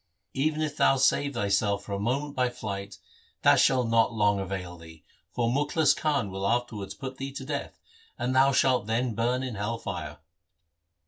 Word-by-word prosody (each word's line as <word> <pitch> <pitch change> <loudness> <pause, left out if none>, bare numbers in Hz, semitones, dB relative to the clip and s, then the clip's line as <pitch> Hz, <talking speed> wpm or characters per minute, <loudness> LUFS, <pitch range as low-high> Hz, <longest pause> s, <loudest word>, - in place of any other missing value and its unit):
Even 155 +3 0
if 150 -1 -3
thou 135 - +4
save 140 +1 +2
thyself 100 -1 +1
for 100 - -10
a 100 - -2
moment 140 +7 -2
by 125 -2 +1
flight, 100 -5 -6 0.5
that - - +6
shall 130 -2 +4
not 115 0 +3
long 105 -3 +2
avail 90 -2 -5
thee, 80 -2 -14 0.3
for 120 -2 0
Mukhlis 145 +5 +2
Khan 145 - 0
will 95 +1 -2
afterwards 115 -3 -2
put 130 -1 -7
thee 135 0 -5
to 135 -1 -6
death, 145 0 -4 0.4
and 125 +2 -1
thou 135 +1 +5
shalt 125 -4 +2
then 115 +2 0
burn 120 +3 0
in 130 -2 -4
hell 105 +3 -3
fire.' - - -6
120 Hz, 180 wpm, -27 LUFS, 100-135 Hz, 0.5 s, that